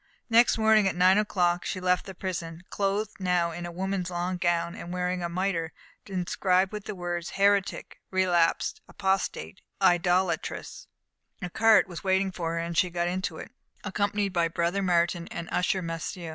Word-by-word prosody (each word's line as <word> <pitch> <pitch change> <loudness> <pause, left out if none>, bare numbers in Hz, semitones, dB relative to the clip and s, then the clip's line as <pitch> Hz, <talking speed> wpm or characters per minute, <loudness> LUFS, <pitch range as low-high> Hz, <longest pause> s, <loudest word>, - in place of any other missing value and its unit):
Next 235 +1 +5
morning 220 -2 +4
at 185 - -1
nine 185 +3 +5
o'clock 180 -4 +1
she 185 - -3
left 180 +1 +1
the 190 - -8
prison, 170 -2 -5
clothed 205 +1 -1
now 180 -2 +1
in 175 +1 -6
a - - -7
woman's 185 0 -2
long 180 +1 -2
gown, 170 -1 0
and 175 - -8
wearing 180 0 -1
a 170 - -2
mitre, 170 -2 -2 0.3
inscribed 185 0 +1
with 210 -1 -6
the 210 - -5
words, 175 -1 -4
Heretic, 200 -1 +1
Relapsed, 180 -3 +1
Apostate, 190 - -2 0.2
Idolatress. 175 -1 +1 0.6
A 180 - -4
cart 225 0 +5
was 175 -3 -8
waiting 190 0 +1
for 165 -2 -3
her, - - -2
and 170 0 -3
she 180 +1 +3
got 175 0 -1
into 180 -2 -2
it, - - -9 0.3
accompanied 205 -1 -1
by 170 -2 +2
Brother 170 +3 -1
Martin 175 -2 +1
and 170 0 -6
the - - -8
usher 185 +1 +1
Massieu. 165 +1 -5
180 Hz, 175 wpm, -27 LUFS, 170-195 Hz, 0.6 s, Next